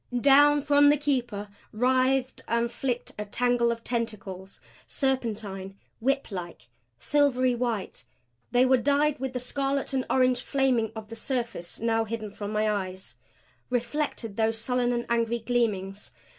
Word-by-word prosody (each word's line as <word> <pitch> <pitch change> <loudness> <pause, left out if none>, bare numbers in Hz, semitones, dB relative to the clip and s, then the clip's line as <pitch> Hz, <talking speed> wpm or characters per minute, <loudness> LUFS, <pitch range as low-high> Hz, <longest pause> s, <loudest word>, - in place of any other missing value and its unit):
Down 290 +1 +6
from 290 0 +5
the 295 - +4
Keeper 245 -8 -1 0.2
writhed 255 +2 +1
and 235 0 0
flicked 245 0 -3
a 210 - -3
tangle 240 +2 +1
of 230 0 -5
tentacles; 200 -5 -4 0.3
serpentine, 210 -8 -2 0.2
whiplike. 210 - -3 0.3
Silvery 255 - +2
white, 235 -4 -3 0.4
they 245 +1 +4
were 260 0 +5
dyed 285 +3 +2
with 265 -1 -3
the 250 - -2
scarlet 275 +2 -1
and 260 -1 +1
orange 255 -1 +3
flaming 260 -6 +1
of 220 -1 -8
the 230 - -7
surface 235 -9 -3
now 225 0 +1
hidden 220 -1 -5
from 205 0 -5
my 215 0 +1
eyes; 190 -2 -3 0.5
reflected 245 -3 -2
those 225 0 +1
sullen 245 +1 0
and 240 -1 -1
angry 235 0 +1
gleamings. 215 -4 -1
240 Hz, 140 wpm, -27 LUFS, 215-265 Hz, 0.5 s, Down